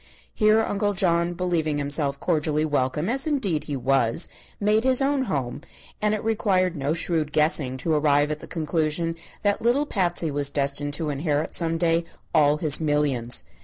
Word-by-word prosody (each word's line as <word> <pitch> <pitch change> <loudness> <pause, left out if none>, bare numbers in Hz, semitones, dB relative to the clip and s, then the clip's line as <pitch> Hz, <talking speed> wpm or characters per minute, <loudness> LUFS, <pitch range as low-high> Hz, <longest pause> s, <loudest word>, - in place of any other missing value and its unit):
Here 215 0 +3
Uncle 205 -1 -1
John, 175 -2 +1
believing 170 -4 -1
himself 140 -1 0
cordially 155 -2 0
welcome, 145 +1 -1
as 270 +6 0
indeed 210 - 0
he 145 - -4
was, 135 +2 +1 0.3
made 210 +2 +2
his 260 -1 +3
own 275 -1 +1
home, 135 - -3 0.4
and 210 0 +2
it 210 - -6
required 195 -5 +1
no 145 +2 -1
shrewd 160 -3 -1
guessing 150 -4 +2
to 160 +5 -1
arrive 145 -1 +2
at 150 - -3
the - - -10
conclusion 165 0 -1 0.3
that 205 -1 +1
little 245 +6 +2
Patsy 175 - 0
was 145 0 +1
destined 145 0 0
to 155 -1 -2
inherit 145 +1 -2
some 165 -1 +1
day 165 0 +2 0.3
all 145 0 +4
his 150 -2 +2
millions. 145 -6 0
160 Hz, 165 wpm, -24 LUFS, 145-190 Hz, 0.4 s, all